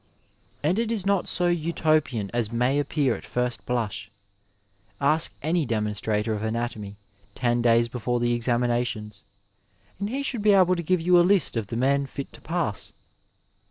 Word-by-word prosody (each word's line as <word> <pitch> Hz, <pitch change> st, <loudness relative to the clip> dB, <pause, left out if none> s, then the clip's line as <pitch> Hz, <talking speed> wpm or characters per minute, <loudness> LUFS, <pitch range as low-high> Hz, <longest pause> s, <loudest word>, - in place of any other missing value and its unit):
And 175 Hz, +8 st, +2 dB
it 230 Hz, -1 st, 0 dB
is 210 Hz, -5 st, -1 dB
not 200 Hz, -2 st, +1 dB
so 180 Hz, -, +1 dB
Utopian 155 Hz, -, +1 dB
as 120 Hz, -2 st, -1 dB
may 125 Hz, +4 st, +1 dB
appear 145 Hz, -3 st, 0 dB
at -, -, -9 dB
first 125 Hz, -1 st, -3 dB
blush. 105 Hz, -5 st, -2 dB, 0.9 s
Ask 155 Hz, +3 st, +2 dB
any 165 Hz, +2 st, +1 dB
demonstrator 105 Hz, -2 st, -1 dB
of 105 Hz, -, -3 dB
anatomy 110 Hz, -2 st, -3 dB, 0.4 s
ten 120 Hz, -1 st, +1 dB
days 115 Hz, 0 st, +4 dB
before 120 Hz, 0 st, -2 dB
the 120 Hz, 0 st, +1 dB
examinations, 120 Hz, -3 st, -1 dB, 0.8 s
and 200 Hz, +1 st, -2 dB
he 275 Hz, +4 st, -2 dB
should 250 Hz, -5 st, -2 dB
be 210 Hz, 0 st, +5 dB
able 185 Hz, -2 st, +5 dB
to 175 Hz, -, -1 dB
give 180 Hz, +1 st, +1 dB
you 175 Hz, +1 st, +5 dB
a -, -, +7 dB
list 180 Hz, -5 st, +3 dB
of 115 Hz, -3 st, -2 dB
the 115 Hz, -, -4 dB
men 140 Hz, +2 st, +2 dB
fit 140 Hz, 0 st, -7 dB
to -, -, -13 dB
pass. 160 Hz, -, -3 dB
125 Hz, 165 wpm, -25 LUFS, 115-170 Hz, 0.9 s, a